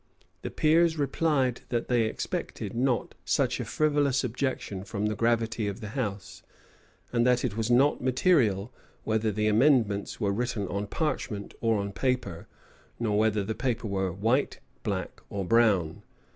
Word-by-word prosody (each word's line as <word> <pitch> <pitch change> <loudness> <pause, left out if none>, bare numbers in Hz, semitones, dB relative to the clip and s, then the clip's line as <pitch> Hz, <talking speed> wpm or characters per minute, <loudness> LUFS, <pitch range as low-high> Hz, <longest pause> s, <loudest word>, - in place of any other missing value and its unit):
The - - -4
peers 160 +1 +3
replied 140 -3 +1
that 120 -1 -1
they 120 -2 +2
expected 110 - -4
not 125 0 0
such - - +1
a - - -3
frivolous 145 -3 +1
objection 125 -6 -3
from 105 0 -3
the 105 0 0
gravity 115 -1 0
of 100 +1 -4
the 105 -3 -6
house; 100 -6 -4 0.7
and 120 -1 +3
that 125 0 +3
it 110 -5 -2
was 115 0 -1
not 135 +4 +4
material, 125 - +2 0.3
whether 110 0 0
the 105 +1 -1
amendments 110 -3 +2
were 100 -3 +1
written 115 -2 -2
on 100 +1 -3
parchment 130 -7 -3
or 115 -2 +2
on 100 0 -3
paper, 120 -5 -2 0.5
nor 110 -3 0
whether 110 -2 +2
the 110 +3 -3
paper 120 -1 -2
were 95 -2 -1
white, 115 +10 0 0.2
black, - - -4
or 100 -2 -3
brown. 100 -7 +2
115 Hz, 155 wpm, -28 LUFS, 100-130 Hz, 0.7 s, not